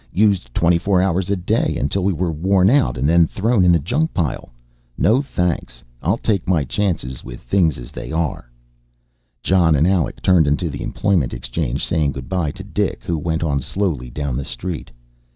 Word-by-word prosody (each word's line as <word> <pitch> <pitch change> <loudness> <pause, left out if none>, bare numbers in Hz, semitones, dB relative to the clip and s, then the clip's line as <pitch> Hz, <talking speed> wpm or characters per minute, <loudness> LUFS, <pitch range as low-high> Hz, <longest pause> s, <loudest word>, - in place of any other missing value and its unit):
Used 100 - +2
twenty 85 0 +3
four 95 0 +2
hours 95 0 0
a 100 - +2
day 90 -2 0
until 90 +8 0
we 100 - +2
were 85 0 -1
worn 95 +5 +3
out 140 - +2
and 65 +3 0
then 85 +1 +5
thrown 105 +2 +1
in 90 - +5
the 85 - +5
junk 150 - -1
pile. 80 -10 -2 0.5
No 120 +6 +3
thanks, 90 - -3 0.2
I'll 95 +8 +1
take 105 -6 -1
my 85 -5 +3
chances 70 -6 -2
with - - -9
things 80 +3 +1
as - - -9
they - - -7
are." 80 -6 -2 0.9
Jon 85 -4 +3
and 75 +2 +3
Alec 90 -5 0
turned 90 -5 +4
into 75 +3 0
the 70 - -6
employment 85 -13 0
exchange, 60 +2 -3
saying 75 -3 0
good 65 -1 -7
by 90 -5 0
to 95 +5 -8
Dik 100 0 -2
who 85 - -1
went 80 +1 -2
on 70 -4 0
slowly 75 -3 -2
down 70 0 -3
the 70 - -2
street. 85 +7 -5
85 Hz, 190 wpm, -20 LUFS, 70-95 Hz, 0.9 s, then